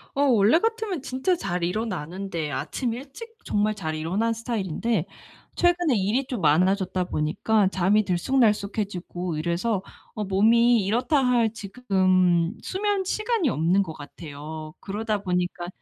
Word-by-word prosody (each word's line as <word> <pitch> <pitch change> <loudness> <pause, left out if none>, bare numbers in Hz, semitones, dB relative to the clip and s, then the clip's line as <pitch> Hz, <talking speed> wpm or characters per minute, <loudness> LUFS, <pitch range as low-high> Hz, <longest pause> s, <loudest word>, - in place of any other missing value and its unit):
어 280 - +1
원래 235 +2 +5
같으면 445 - -1
진짜 265 +8 0
잘 180 - -3
일어나는데 180 -4 -3
아침 240 -4 -2
일찍 285 - -9
정말 210 +1 +1
잘 160 -5 -4
일어나는 195 +9 0
스타일인데 225 -3 -2 0.5
최근에 350 -6 +2
일이 215 +7 +1
좀 240 -7 -4
많아졌다 185 +4 +2
보니까 185 +7 +1
잠이 195 +3 +2
들쑥날쑥해지고 200 - 0
이래서 180 +6 -1 0.3
어 215 - -3
몸이 225 +3 +4
이렇다 245 +8 +1
할 235 -3 +3
지금 185 -5 +1
수면 400 0 -1
시간이 430 - 0
없는 175 +3 +2
것 160 -3 -7
같아요. 155 +1 -9
그러다 210 0 -3
보니까 180 -1 -2
205 Hz, 305 characters per minute, -25 LUFS, 180-245 Hz, 0.5 s, 원래